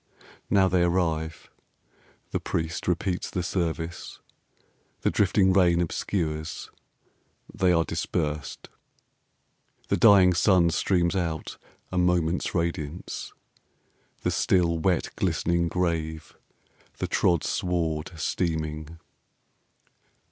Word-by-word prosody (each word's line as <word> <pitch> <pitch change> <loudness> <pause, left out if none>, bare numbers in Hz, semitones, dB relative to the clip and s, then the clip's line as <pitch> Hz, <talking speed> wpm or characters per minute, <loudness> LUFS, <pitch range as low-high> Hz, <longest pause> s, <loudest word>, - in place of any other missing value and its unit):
Now 95 -2 +4
they 90 -1 +2
arrive. 80 -2 -1 0.8
The - - -1
priest 80 0 -3
repeats 90 +1 -1
the 90 - -2
service. 85 -1 -3 0.8
The - - +1
drifting 95 -1 +3
rain 90 -3 +4
obscures. 80 -2 -3 0.8
They 95 -1 +2
are 85 -1 +3
dispersed. 75 -2 -3 1.2
The - - +2
dying 100 -5 +6
sun 90 -2 +4
streams 90 0 +1
out: 80 -4 -3 0.3
a 90 - 0
moment's 90 -1 +1
radiance; 85 -1 -3 0.9
The - - +1
still, 85 -3 +2
wet, 90 0 0
glistening 85 0 +1
grave; 80 -3 -2 0.6
the - - -2
trod 85 -3 +2
sward 80 -3 -1
steaming. 80 -1 -3
85 Hz, 95 wpm, -26 LUFS, 80-90 Hz, 1.2 s, dying